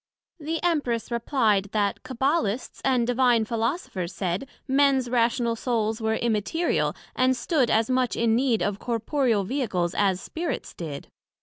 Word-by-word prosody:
The 320 +2 -3
Empress 285 -10 0
replied, 230 -4 +1
That 205 -2 0
Cabbalists 260 -2 -1
and 255 -3 +2
Divine 245 -2 +3
Philosophers 225 - -2
said, 185 +8 -2 0.2
Mens 270 -1 +3
rational 235 -1 +2
Souls 225 -2 -1
were 220 0 +1
Immaterial, 235 - 0 0.2
and 255 0 +2
stood 265 -1 +1
as 220 0 +3
much 255 -2 +1
in 230 -1 +2
need 245 -2 +2
of 205 0 -1
corporeal 235 -1 0
Vehicles, 185 -7 -1
as 195 -3 +1
Spirits 330 - -4
did. 155 -5 -7
235 Hz, 135 wpm, -25 LUFS, 215-265 Hz, 0.2 s, Divine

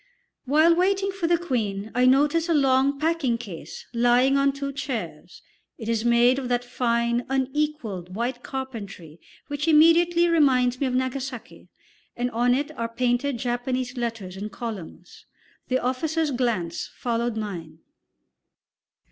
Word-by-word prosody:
While 310 +5 +4
waiting 390 +2 +1
for 380 -3 -2
the 345 0 +3
Queen 220 - -3
I 250 +1 +3
notice 295 +6 +3
a 330 - +3
long 275 0 +3
packing 310 -6 +1
case 205 -8 -9
lying 245 +3 +3
on 275 0 +3
two 275 0 -5
chairs; 270 -4 -6 0.3
it 220 - -8
is 230 -1 0
made 240 +2 +4
of 255 -2 -5
that 245 0 +1
fine, 235 -1 0
unequalled, 265 - -2
white 245 +2 -2
carpentry 205 - -7 0.3
which 290 +2 -4
immediately 335 +2 +5
reminds 260 -6 +3
me 275 - +2
of 250 - -1
Nagasaki, 260 -1 -4 0.5
and 245 +1 -1
on 245 +2 +2
it 290 +3 -2
are 230 0 -3
painted 245 +3 0
Japanese 250 +1 -2
letters 225 -6 -4
in 205 +2 -5
columns. 215 -7 -8 0.4
The 255 - +1
officer's 300 +5 -1
glance 230 -10 -1
followed 235 -1 -2
mine. 170 -7 -6
250 Hz, 140 wpm, -25 LUFS, 235-285 Hz, 0.5 s, immediately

